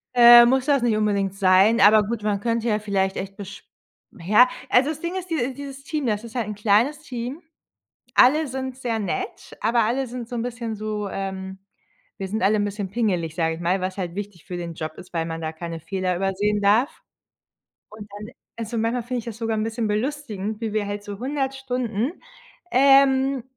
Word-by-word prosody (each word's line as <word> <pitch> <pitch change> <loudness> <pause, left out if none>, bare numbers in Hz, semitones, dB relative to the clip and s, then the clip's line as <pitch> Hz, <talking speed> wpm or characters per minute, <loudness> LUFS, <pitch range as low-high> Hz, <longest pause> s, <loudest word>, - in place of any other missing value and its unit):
Äh, 240 0 +10
muss 260 +1 +2
das 280 -3 +3
nicht 235 -3 +2
unbedingt 200 -2 0
sein, 195 +4 +4
aber 210 +1 +7
gut, 215 +1 -4
man 210 -1 0
könnte 230 +1 -1
ja 215 -2 +1
vielleicht 195 -2 -1
echt 195 +1 -5
besch 195 -1 -9 0.6
ja, 210 +9 +5 0.2
also 260 +4 +4
das 310 0 -5
Ding 345 +2 -3
ist, 370 -1 -5
diese 270 -6 -1
dieses 275 0 -9
Team, 300 -1 -3
das 210 -2 -1
ist 230 -1 -10
halt 235 -4 -1
'n 210 - -5
kleines 215 +8 +2
Team. 255 +1 -6 0.7
Alle 300 +5 +5
sind 260 -1 -5
sehr 240 -4 -2
nett, 380 - -5
aber 230 +1 +3
alle 260 +4 0
sind 245 -1 -7
so 245 - -7
'n 230 - -2
bisschen 235 -2 -4
so, 210 -1 -3
ähm 190 0 -5 0.6
„wir 195 - -4
sind 215 +2 -3
alle 205 +3 +3
'n 205 - +1
bisschen 205 -1 -4
pingelig“, 185 -8 -1
sage 165 -2 0
ich 165 - -9
mal, 180 +3 0
was 185 0 -3
halt 180 -3 -4
wichtig 200 -4 -7
für 180 - -6
den 170 -1 -5
Job 155 0 -5
ist, 180 - -12
weil 165 -1 0
man 165 0 -5
da 160 -1 -4
keine 165 0 -7
Fehler 185 +2 -2
übersehen 200 +3 0
darf. 215 +8 +2 0.9
Und 210 -1 -11
dann 210 +1 -8 0.3
also, 230 0 -4
manchmal 230 +2 0
finde 250 +1 -3
ich 230 - -9
das 230 -2 -7
sogar 225 -1 -2
'n 215 - 0
bisschen 225 0 -2
belustigend, 215 -2 -3
wie 225 -2 -2
wir 210 -1 -1
halt 205 0 -5
so 205 -1 -7
100 270 +1 -2
Stunden, 250 - -2 0.6
ähm, 270 -1 +4
220 Hz, 205 wpm, -23 LUFS, 195-250 Hz, 0.9 s, Äh